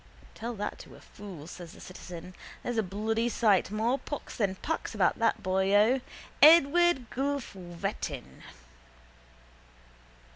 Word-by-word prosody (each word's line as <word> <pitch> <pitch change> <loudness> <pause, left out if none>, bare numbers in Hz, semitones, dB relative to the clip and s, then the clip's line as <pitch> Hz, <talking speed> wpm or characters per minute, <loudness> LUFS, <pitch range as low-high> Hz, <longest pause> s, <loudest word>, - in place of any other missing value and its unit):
—Tell 235 +1 -5
that 205 0 -4
to - - -12
a - - -14
fool, 190 -8 -11
says 175 0 -10
the - - -14
citizen. 180 -1 -9 0.3
There's 240 -2 -1
a - - +4
bloody 220 +4 -1
sight 210 -6 +3
more 225 +6 0
pox 290 - -7
than 200 -4 0
pax 320 +11 -4
about - - +2
that 230 -1 +1
boyo. 200 +6 +3 0.4
Edward 320 -2 +6
Guelph 280 -1 -2
Wettin! 175 - -6
210 Hz, 125 wpm, -29 LUFS, 185-245 Hz, 0.4 s, Edward